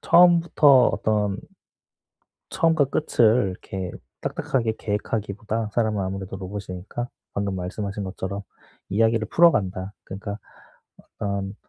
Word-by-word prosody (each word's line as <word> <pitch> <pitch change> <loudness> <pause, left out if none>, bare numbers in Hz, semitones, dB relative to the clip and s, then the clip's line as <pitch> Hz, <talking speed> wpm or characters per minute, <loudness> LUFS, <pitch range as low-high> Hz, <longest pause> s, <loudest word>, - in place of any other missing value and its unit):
처음부터 170 -7 +6
어떤 105 -2 0 1.1
처음과 160 -4 +3
끝을 115 -7 +3
이렇게 95 0 -6 0.3
딱딱하게 115 -4 -1
계획하기보다 105 +1 -2
사람은 110 -4 +1
아무래도 95 0 -4
로봇이 100 +1 -6
아니니까 95 +7 -5 0.3
방금 100 -1 -1
말씀하신 100 +2 -4
것처럼 95 +1 -4 0.5
'이야기를 110 +1 +2
풀어간다.' 100 - +3
그러니까 100 +2 -6 0.6
어떤 100 0 -4
105 Hz, 315 characters per minute, -24 LUFS, 95-115 Hz, 1.1 s, 처음부터